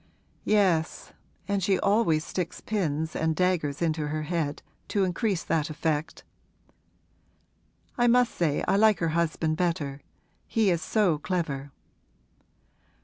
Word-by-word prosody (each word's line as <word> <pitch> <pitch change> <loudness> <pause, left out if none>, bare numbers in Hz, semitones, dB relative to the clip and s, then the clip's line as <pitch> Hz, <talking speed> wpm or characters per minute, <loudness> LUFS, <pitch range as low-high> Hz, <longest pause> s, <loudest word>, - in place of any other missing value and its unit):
'Yes, 185 -6 +1 0.3
and 200 -1 0
she 190 +1 +2
always 200 -7 +2
sticks 180 -3 -4
pins 160 -7 -2
and 160 0 0
daggers 170 -5 0
into 155 -2 0
her 155 +1 -3
head, 155 -2 -2 0.2
to 200 -2 +1
increase 190 0 -1
that 160 -1 0
effect. 155 0 -2 1.8
I 240 - +4
must 245 0 +4
say 155 -4 0
I - - +3
like 215 0 +5
her 165 - 0
husband 160 -1 0
better: 160 -6 -1 0.5
he 220 -4 +2
is 170 -2 0
so 185 -8 +1
clever.' 145 -6 -3
170 Hz, 125 wpm, -27 LUFS, 155-195 Hz, 1.8 s, like